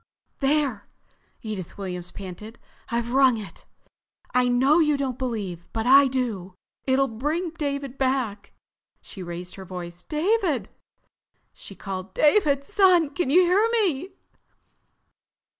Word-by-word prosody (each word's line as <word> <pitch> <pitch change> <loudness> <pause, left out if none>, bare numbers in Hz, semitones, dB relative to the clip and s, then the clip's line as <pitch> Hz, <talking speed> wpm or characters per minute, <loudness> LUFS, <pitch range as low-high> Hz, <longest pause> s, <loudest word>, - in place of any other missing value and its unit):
"There!" 275 -5 0 0.6
Edith 210 -6 -6
Williams 180 -3 -5
panted. 200 +4 -9 0.3
"I've 235 0 -2
rung 260 -2 +5
it. 210 -3 -10 0.7
I 250 0 +3
know 265 +6 +4
you 300 -3 +3
don't 265 -3 -3
believe, 205 -9 -4
but 225 0 -2
I 275 +2 +7
do. 225 -8 -3 0.3
It'll 270 +1 +3
bring 300 +10 -2
David 280 -4 -4
back." 255 -6 -1 0.5
She 195 - -10
raised 175 0 -6
her 190 - -8
voice. 175 -1 -8
"David!" 315 - 0 0.8
she 195 - -11
called. 190 -1 -6
"David, 295 -4 +3
son! 365 -6 +4
Can 350 -2 -1
you 345 +6 +6
hear 380 +6 +3
me?" 375 - 0
260 Hz, 125 wpm, -25 LUFS, 200-300 Hz, 0.8 s, I